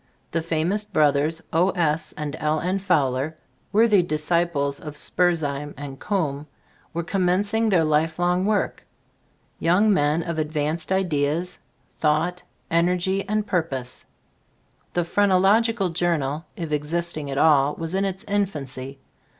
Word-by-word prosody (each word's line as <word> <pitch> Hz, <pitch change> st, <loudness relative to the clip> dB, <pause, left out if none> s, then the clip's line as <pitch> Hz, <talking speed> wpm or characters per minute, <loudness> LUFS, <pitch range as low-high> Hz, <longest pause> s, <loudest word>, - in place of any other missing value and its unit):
The 165 Hz, -, 0 dB
famops 165 Hz, +6 st, 0 dB
brothers, 150 Hz, 0 st, +2 dB
O. 175 Hz, +4 st, +3 dB
S. 160 Hz, -4 st, 0 dB
and 150 Hz, 0 st, -5 dB
L. 155 Hz, +1 st, +1 dB
N. 185 Hz, +4 st, -1 dB
Fowler, 150 Hz, -5 st, 0 dB, 0.3 s
worthy 210 Hz, -2 st, +5 dB
dis 155 Hz, -3 st, -2 dB
ciples 165 Hz, -5 st, 0 dB
of 150 Hz, -1 st, -8 dB
Spurzheim 150 Hz, -4 st, 0 dB
and 140 Hz, -1 st, -7 dB
Coombe, 150 Hz, -8 st, -2 dB, 0.4 s
were 170 Hz, +1 st, -3 dB
commencing 200 Hz, +5 st, +1 dB
their 180 Hz, -5 st, +4 dB
lifelong 165 Hz, +4 st, +1 dB
work. 210 Hz, -1 st, 0 dB, 0.8 s
Young 200 Hz, +6 st, +3 dB
men 150 Hz, 0 st, +2 dB
of 170 Hz, -2 st, -3 dB
advanced 155 Hz, +2 st, -2 dB
ideas, 175 Hz, -1 st, 0 dB, 0.4 s
thought, 160 Hz, +4 st, +1 dB, 0.3 s
energy 180 Hz, +4 st, +1 dB
and 215 Hz, 0 st, 0 dB
purpose. 135 Hz, -10 st, -3 dB, 0.9 s
The 175 Hz, -, +2 dB
"Phrenological 200 Hz, +3 st, +3 dB
Journal," 165 Hz, -3 st, -1 dB
if 165 Hz, -3 st, -5 dB
existing 155 Hz, 0 st, -2 dB
at 135 Hz, -, -3 dB
all, 145 Hz, -1 st, +4 dB
was 165 Hz, +1 st, -4 dB
in 195 Hz, +1 st, +1 dB
its 190 Hz, -1 st, -3 dB
infancy. 140 Hz, -10 st, -3 dB
165 Hz, 125 wpm, -24 LUFS, 150-185 Hz, 0.9 s, worthy